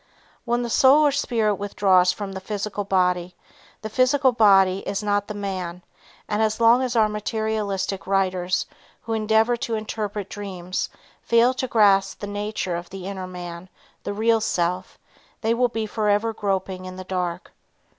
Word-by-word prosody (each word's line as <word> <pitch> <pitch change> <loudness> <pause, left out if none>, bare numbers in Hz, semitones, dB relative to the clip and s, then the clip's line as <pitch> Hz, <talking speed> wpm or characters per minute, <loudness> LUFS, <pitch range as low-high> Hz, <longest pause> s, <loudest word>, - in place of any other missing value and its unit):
When 240 0 0
the 240 - -3
soul 280 +6 +6
or 290 - +4
spirit 225 -7 0
withdraws 190 -3 +3
from 200 +1 -6
the 190 - -6
physical 205 +1 -4
body, 180 -2 0 0.5
the - - -3
physical 255 +3 +3
body 195 -5 +5
is 200 +1 -4
not 205 -1 0
the 210 - -6
man, 185 -3 -5 0.4
and 210 +1 -1
as 220 0 +1
long 235 +2 +5
as 250 -2 -2
our 220 -2 +4
materialistic 210 -2 -2
writers 185 -2 0 0.4
who 225 - -3
endeavor 220 +2 +2
to 230 -1 -2
interpret 210 -2 -4
dreams 185 -3 -4 0.3
fail 235 +2 +3
to 260 0 -3
grasp 200 -4 +3
the - - -6
nature 205 -3 -3
of 170 0 -6
the 190 -1 -8
inner 190 -1 -5
man, 175 0 -8 0.3
the - - -4
real 225 +2 +2
self, 180 -2 -1 0.4
they 225 +1 +2
will 245 +1 +2
be 225 -2 -3
forever 215 +1 0
groping 190 -3 -2
in 185 0 -7
the 185 - -7
dark. 180 -1 -4
205 Hz, 165 wpm, -23 LUFS, 185-220 Hz, 0.5 s, soul